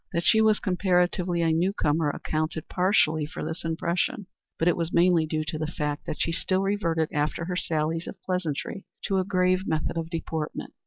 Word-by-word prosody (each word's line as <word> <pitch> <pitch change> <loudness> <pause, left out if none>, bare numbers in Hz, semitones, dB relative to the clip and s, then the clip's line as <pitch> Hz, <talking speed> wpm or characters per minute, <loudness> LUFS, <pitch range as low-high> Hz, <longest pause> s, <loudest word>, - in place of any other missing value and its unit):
That 170 - 0
she 220 - +5
was 215 -1 +4
comparatively 180 -2 +1
a 165 - +3
new 175 +5 +2
comer 150 -4 +1
accounted 155 +1 -2
partially 160 -5 +2
for - - -6
this 160 +3 -4
impression, 170 +4 -1 0.3
but 165 - +1
it 175 - +4
was 165 0 -2
mainly 170 -2 +4
due 155 0 -1
to 155 +1 -4
the 155 - -1
fact 150 -2 -3
that - - -4
she 165 - +1
still 185 +3 0
reverted 170 -6 0
after 150 +3 -1
her 180 +1 -3
sallies 165 -1 -1
of 190 - -8
pleasantry 180 +1 -3 0.2
to 195 -1 +1
a - - +2
grave 185 0 +1
method 160 +1 -1
of 165 0 -3
deportment. 160 -2 -4
170 Hz, 195 wpm, -26 LUFS, 160-185 Hz, 0.3 s, she